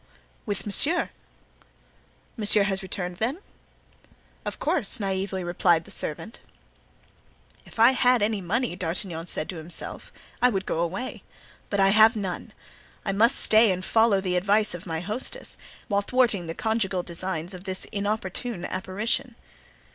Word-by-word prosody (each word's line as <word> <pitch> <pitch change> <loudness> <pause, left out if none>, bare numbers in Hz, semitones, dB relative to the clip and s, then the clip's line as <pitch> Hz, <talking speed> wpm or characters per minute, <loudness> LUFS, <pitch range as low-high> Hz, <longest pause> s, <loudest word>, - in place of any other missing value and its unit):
"With 205 -1 -3
monsieur." 305 - +3 1.2
"Monsieur 210 -1 +4
has 195 -1 -1
returned, 180 -2 -4
then?" 240 - -1 1.1
"Of - - -4
course," - - -1
naively 190 -1 -2
replied 175 -1 +2
the - - -13
servant. 215 +9 -2 1.3
"If - - -15
I 230 +3 +8
had 250 -3 +3
any 210 -1 0
money," 235 +8 0
said 180 - -8
D'Artagnan 165 -1 -3
to 175 +2 -4
himself, 160 +2 -6 0.3
"I 250 - +6
would 195 -5 -2
go - - -1
away; 190 +10 -3 0.5
but 200 - -1
I 195 0 +5
have 220 +3 +6
none. 195 -4 -4 0.5
I 195 - +1
must 230 +7 +4
stay 220 -1 +5
and 185 0 -2
follow 220 -3 +4
the 185 -2 0
advice 205 +3 +2
of 175 +1 -7
my 160 -1 -2
hostess, 215 +8 -2 0.3
while 200 -3 +1
thwarting 220 -6 +2
the 165 - -5
conjugal 215 -5 0
designs 175 0 -4
of 185 +1 -10
this 190 -1 -4
inopportune 205 0 -3
apparition." 215 +6 -2
195 Hz, 145 wpm, -26 LUFS, 180-220 Hz, 1.3 s, I